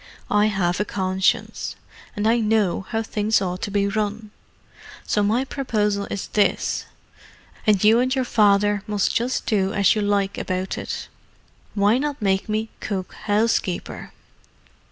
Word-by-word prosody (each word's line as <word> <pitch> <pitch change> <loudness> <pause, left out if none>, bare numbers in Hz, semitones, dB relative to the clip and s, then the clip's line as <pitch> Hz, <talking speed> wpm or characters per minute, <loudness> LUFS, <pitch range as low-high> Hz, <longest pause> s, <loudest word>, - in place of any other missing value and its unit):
I 210 +1 +4
have 185 -3 0
a - - +2
conscience: 190 -1 -1 0.4
and 205 +1 0
I 235 +1 +3
know 210 -4 +1
how 225 -1 -1
things 215 0 +1
ought 185 -1 -3
to 210 - -3
be 200 0 +1
run. 210 +1 -2 0.7
So 210 - +1
my 225 +6 +1
proposal 210 -7 -1
is 200 - -3
this, 205 -1 0 0.8
and 210 -2 +4
you 220 +2 +6
and 255 +1 +1
your 260 -1 0
father 205 -2 +3
must 205 -2 0
just 245 +3 -1
do 195 -3 +1
as 200 -2 +4
you 215 - -1
like 200 -1 0
about 185 0 -2
it. - - -5 0.7
Why 205 +4 +3
not 290 0 -2
make 195 -1 0
me 215 +1 -1
cook 190 -3 -4
housekeeper?" 210 -3 0
205 Hz, 150 wpm, -23 LUFS, 200-220 Hz, 0.8 s, you